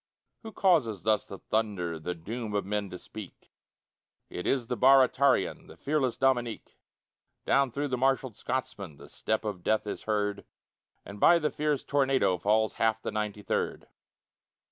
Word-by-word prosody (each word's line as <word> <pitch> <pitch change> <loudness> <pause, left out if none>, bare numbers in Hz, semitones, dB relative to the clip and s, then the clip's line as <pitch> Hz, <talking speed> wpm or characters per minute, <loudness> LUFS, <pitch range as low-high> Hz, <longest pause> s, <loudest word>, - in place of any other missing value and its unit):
Who 225 - -8
causes 150 - +2
thus 110 -1 +1
the 100 - -8
thunder 95 -7 -2
The 90 +3 -4
doom 105 +5 -5
of 100 - 0
men 105 0 -2
to 90 - -7
speak? 105 +1 -11 0.8
It 90 - -5
is 130 -3 +1
the 125 - -2
Baratarian, 135 +1 +4
The - - -14
fearless 140 -4 0
Dominique. 120 -4 -1 0.7
Down 140 -1 +3
through 140 +4 -3
the 125 -1 -2
marshalled 130 -3 +1
Scotsmen 125 - -4
The - - -13
step 110 0 -2
of 100 -4 -4
death 110 +4 +1
is 105 - -6
heard, 105 -1 -1 0.6
And 100 +1 -9
by 170 - +6
the 155 -2 -1
fierce 150 -2 -1
tornado 135 -9 +2
Falls 110 +3 +2
half 110 -1 +2
the - - -4
Ninety 105 -1 -3
third. - - -2
110 Hz, 160 wpm, -29 LUFS, 105-135 Hz, 0.8 s, by